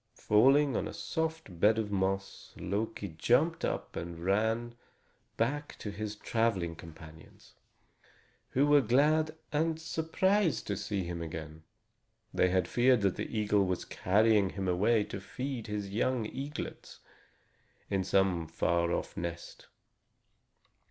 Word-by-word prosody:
Falling 135 +6 +4
on - - -1
a - - -7
soft 160 - -3
bed 110 +4 +5
of 105 -2 -2
moss, 95 0 -2
Loki 100 +3 -3
jumped 125 - +1
up - - -3
and 85 0 -6
ran 110 +4 +1 0.6
back 145 +6 -1
to 105 - -5
his 105 +1 -5
traveling 105 -7 0
companions, 80 -1 -14 1.0
who 135 +3 +2
were 145 0 +6
glad 155 +6 +2 0.2
and 160 +1 +1
surprised 165 - +1
to - - -2
see 100 -3 -2
him 85 -1 -5
again. 80 -1 -7 0.7
They 90 - +3
had 90 -1 +1
feared 125 +2 +3
that 100 -2 +1
the - - -4
eagle 105 -1 +3
was 90 -1 -2
carrying 105 +1 +3
him 95 0 -4
away 105 +5 +3
to 100 - -7
feed 130 +3 -5
his 105 -2 -4
young 120 +2 0
eaglets 140 +6 -6 0.9
in 95 -1 0
some 95 -3 +1
far 85 +1 0
off - - -3
nest. 85 0 -6
105 Hz, 130 wpm, -31 LUFS, 90-130 Hz, 1.0 s, were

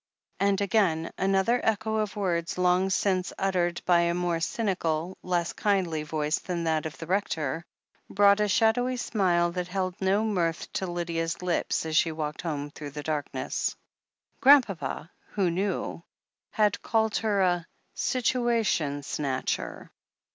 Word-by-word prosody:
And 200 0 +2
again, 190 -6 +1
another 195 +5 +2
echo 220 0 0
of 215 -1 -1
words 175 -5 -1
long 180 +1 +3
since 190 -1 +1
uttered 180 -3 0
by 175 -1 +5
a 170 0 +2
more 175 -1 0
cynical, 175 -3 -1
less 175 -2 -1
kindly 185 -6 0
voice 150 0 -1
than 175 -2 -3
that 160 -1 0
of 155 - -10
the 165 - -7
Rector, 165 -4 -1 0.4
brought 200 +1 +5
a 210 - +2
shadowy 245 +5 +2
smile 180 -7 +1
that 180 0 -3
held 185 0 -2
no 195 +3 +2
mirth 175 -6 -1
to 190 - -2
Lydia's 170 -1 -3
lips 175 -2 0
as 160 -1 -2
she 165 +1 +4
walked 155 -1 -4
home 145 -3 -3
through 150 -1 -8
the 145 +1 -7
darkness. 150 -2 -2 0.7
Grandpapa, 200 - +4 0.2
who 190 -4 +1
knew, 190 -1 -2 0.5
had 210 -2 +1
called 220 -1 +1
her 210 -3 +1
"a 175 -2 +1 0.3
situation 230 - 0
snatcher." 135 -2 -3
180 Hz, 140 wpm, -27 LUFS, 165-200 Hz, 0.7 s, by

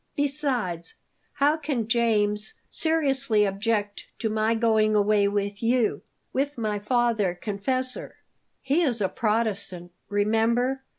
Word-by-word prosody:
Besides, 265 - -2 0.4
how 295 +2 +2
can 285 -8 -2
James 220 - +1 0.2
seriously 275 -9 +2
object 205 +1 -2
to 220 - -2
my 220 +1 +1
going 220 -2 +2
away 205 0 +3
with 200 0 -2
you 235 0 +1 0.3
with 285 +1 -1
my 215 -3 -1
father 220 -4 +1
confessor?" 250 +7 -3 0.5
"He 280 +5 +2
is 255 -9 +1
a 195 -2 +1
Protestant, 200 -5 -1 0.2
remember. 225 +5 +1
225 Hz, 115 wpm, -25 LUFS, 205-255 Hz, 0.5 s, away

